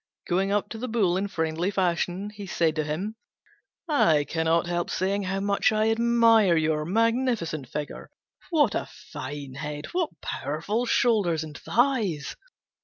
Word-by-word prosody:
Going 190 +3 +1
up 205 0 +1
to 225 - -7
the 255 - -3
Bull 210 -7 +1
in 195 +2 0
friendly 160 0 -1
fashion, 185 +1 -1
he 205 -1 -9
said 165 -3 +1
to 155 - +1
him, 185 +9 -4 0.7
"I 165 - +4
cannot 165 +2 +1
help 175 0 -2
saying 195 +2 -1
how 195 +1 -2
much 200 +1 +2
I 215 +1 +2
admire 230 -5 +4
your 155 -1 +1
magnificent 225 - 0
figure. 150 -1 -6 0.4
What 295 - +3
a - - -3 0.2
fine 140 0 -6
head! 150 +1 -5
What 340 - -2
powerful 205 +12 -2
shoulders 200 -12 +2
and 155 -2 -9
thighs! 220 - 0
190 Hz, 150 wpm, -26 LUFS, 160-225 Hz, 0.7 s, I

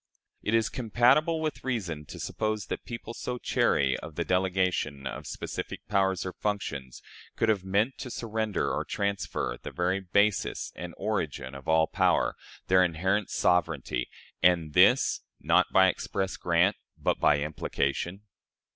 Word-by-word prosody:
Is 115 +1 +2
it - - -4
compatible 125 +7 +3
with 155 -2 -3
reason 90 - -3
to - - -10
suppose 110 -1 -2
that - - -5
people 115 -1 -6
so 125 +1 -4
chary 65 - +2
of 75 - -9
the 85 - -2
delegation 90 -6 0
of - - -5
specific - - -6
powers 95 -2 +1
or 95 - -4
functions 70 -11 -4 0.3
could 115 - +1
have 100 -4 +2
meant 100 +7 0
to 130 - -5
surrender 110 -4 -2
or - - -1
transfer 100 -1 -2
the - - -6
very 90 +2 0
basis 100 +2 +1
and 90 -1 -7
origin 80 -11 -2
of 70 -1 -10
all 80 0 +4
power - - +2 0.3
their 95 0 +5
inherent 95 +4 0
sovereignty 80 -8 +1 0.3
and 85 -3 +3
this, - - +5 0.2
not - - +3
by 95 0 +6
express 95 +1 -2
grant, 90 +3 +2 0.2
but - - 0
by 75 - +4
implication? 75 +4 -2
95 Hz, 145 wpm, -28 LUFS, 80-105 Hz, 0.3 s, by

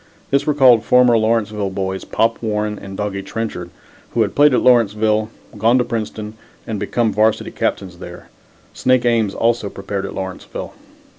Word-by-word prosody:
This 140 +2 +1
recalled 130 -6 +5
former 125 0 +5
Lawrenceville 110 -2 0
boys, 95 0 -4
Pop 115 +1 0
Warren 105 -1 -2
and 95 0 -9
Doggie 105 -1 -3
Trenchard, 100 -4 -5 0.5
who 115 - +4
had 100 - -3
played 145 +1 +5
at 125 - +2
Lawrenceville, 110 -3 +3 0.3
gone 115 +4 +4
to 125 - +2
Princeton 110 -2 -5 0.3
and 105 -3 -4
had 105 - -4
become 115 -2 +1
varsity 110 +1 +1
captains 90 -3 -3
there. 90 -1 -10 0.5
Snake 130 -1 +2
Ames 115 -4 +1
also 115 -3 0
prepared 100 0 -5
at - - -8
Lawrenceville. 95 -1 -6
110 Hz, 160 wpm, -19 LUFS, 100-115 Hz, 0.5 s, recalled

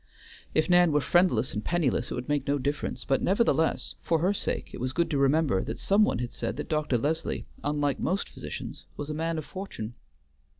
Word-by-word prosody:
If 155 - +3
Nan 175 -2 +5
were 150 - +4
friendless 150 -8 +3
and 105 - -3
penniless 145 -7 +1
it - - -3
would 125 0 -5
make 145 -2 0
no 145 +1 +2
difference; 145 +2 -2
but 135 -1 +2
nevertheless, 190 -5 +2
for 165 - +2
her 180 +5 +2
sake, - - -3
it - - -6
was 130 +1 -2
good 170 +2 +1
to 145 - +1
remember 140 -6 +3
that - - -4
some 200 +2 +3
one - - 0
had 120 0 -4
said 115 - -3
that - - -5
Dr. 150 -5 +1
Leslie, 155 +7 -1 0.2
unlike 145 -1 0
most 190 +4 0
physicians, - - -7
was 145 +1 -4
a - - -2
man 165 +1 -1
of 155 - -4
fortune. 185 - -6
150 Hz, 210 wpm, -28 LUFS, 135-170 Hz, 0.2 s, Nan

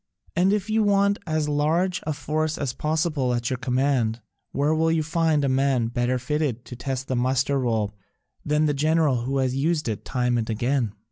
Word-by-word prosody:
And 185 +3 +3
if 205 -1 0
you 220 0 +2
want 200 -1 +3
as 155 -1 0
large 160 +5 +1
a 155 - 0
force 155 +2 -2
as 140 -4 -2
possible 155 -5 0
at 120 +1 -2
your 130 - -1
command, 125 -3 0 0.3
where 145 +3 +1
will 160 +1 +2
you 160 -1 +1
find 160 -2 +1
a - - +1
man 130 -3 +1
better 120 +1 0
fitted 125 -2 -2
to 125 - -8
test 130 +1 -4
the 130 - -1
muster 130 +3 +1
roll 110 -5 0 0.5
than 150 +1 +1
the 150 - +2
general 150 -4 +2
who 135 +2 -1
has 130 -1 0
used 155 +2 0
it 110 -3 -3
time 125 -2 0
and 110 - -3
again? 120 0 0
140 Hz, 195 wpm, -24 LUFS, 125-155 Hz, 0.5 s, And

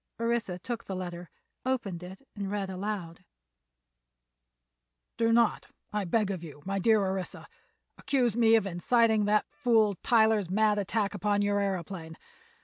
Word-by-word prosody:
Orissa 230 -6 -1
took 230 +5 -5
the 190 - -5
letter, 175 -1 -6 0.3
opened 230 -9 -2
it, 190 +9 -11
and 200 -2 -4
read 200 -1 -3
aloud: 185 -3 -5 2.0
"_Do 230 0 +3
not, 230 -1 +2 0.3
I 210 -2 -1
beg 205 +3 +1
of 180 -3 -5
you, 150 -3 -11
my 195 +1 -1
dear 220 +2 +4
Orissa, 190 -1 -4 0.5
accuse 245 -6 +1
me 225 -1 +5
of 220 - +2
inciting 215 +4 +2
that 210 +1 +2
fool 225 -7 +3
Tyler's 220 -5 +3
mad 210 +2 +2
attack 205 +1 -1
upon 205 +1 0
your 205 0 +1
aëroplane. 180 -4 -3
205 Hz, 140 wpm, -29 LUFS, 185-225 Hz, 2.0 s, me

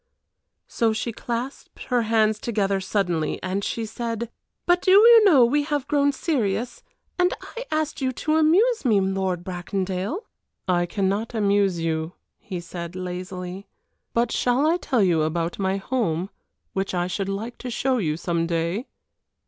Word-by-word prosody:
So 225 -1 +1
she 225 +2 -2
clasped 240 +4 -5
her 245 -2 +1
hands 220 -1 +2
together 200 -4 0
suddenly, 175 -6 -1
and 190 +2 -2
she 225 +2 -2
said: 230 +1 -4 0.3
"But 355 0 +3
do - - 0
you 445 +4 +8
know 285 -11 +7
we 290 +5 +2
have 290 -2 -2
grown 285 -1 +3
serious, 245 - -1 0.4
and 360 0 +3
I - - -8
asked 310 -2 -1
you 260 -1 +1
to 310 +5 0
amuse 390 +10 +4
me, 220 -6 +4
Lord 190 -2 -1
Bracondale!" 190 - -3 0.4
"I 175 -1 +2
cannot 200 +5 -1
amuse 200 -4 +2
you," 160 +1 -2 0.3
he 190 -6 -6
said, 170 0 -7
lazily, 185 +1 -6 0.4
"but 235 0 +1
shall 250 +4 +2
I 330 +3 +3
tell 255 - +1
you 170 -4 +3
about 165 +3 -1
my 190 0 0
home, 195 -5 -1 0.4
which 195 -1 -2
I 175 0 +1
should 195 +2 -3
like 220 +5 -5
to 250 - -5
show 255 +1 0
you 155 -6 -1
some 170 -1 -1
day?" 170 +7 -1
205 Hz, 155 wpm, -24 LUFS, 180-255 Hz, 0.4 s, you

